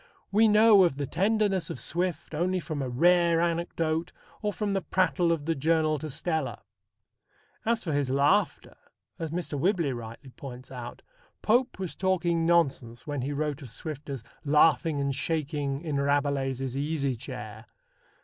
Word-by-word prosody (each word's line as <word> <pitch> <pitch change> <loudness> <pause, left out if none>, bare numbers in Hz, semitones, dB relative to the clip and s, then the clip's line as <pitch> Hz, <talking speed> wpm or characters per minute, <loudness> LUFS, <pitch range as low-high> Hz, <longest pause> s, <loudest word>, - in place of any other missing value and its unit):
We 220 +3 +5
know 210 -1 +7
of 170 -6 +1
the 145 - -2
tenderness 200 - +1
of - - -5
Swift 170 -2 -2
only 180 +4 0
from 155 -4 -4
a 130 - -2
rare 170 +5 +4
anecdote 165 -1 -1 0.3
or 210 -1 0
from 205 0 -2
the 195 - 0
prattle 175 0 +1
of 155 -3 -1
the 165 - +1
Journal 155 +1 +1
to 155 - -5
Stella. 160 0 -2 1.0
As 230 -1 +1
for 160 - -2
his 145 -2 0
laughter, 145 +10 +1 0.4
as 165 -1 -3
Mr. 165 -3 -3
Whibley 170 -4 +1
rightly 120 +3 -9
points 130 -1 -10
out, 120 -2 -8 0.4
Pope 245 +4 +2
was 185 -3 -4
talking 175 -3 +1
nonsense 135 -9 +1
when 145 -3 -3
he 135 +3 -2
wrote 150 0 -2
of 130 - -9
Swift 150 +6 -7
as 135 -5 -5 0.2
laughing 155 +1 +3
and 140 0 0
shaking 145 -1 -2
in 155 -4 -2
Rabelais's 140 -2 0
easy 140 -2 -1
chair. 115 - -8
155 Hz, 160 wpm, -28 LUFS, 140-175 Hz, 1.0 s, know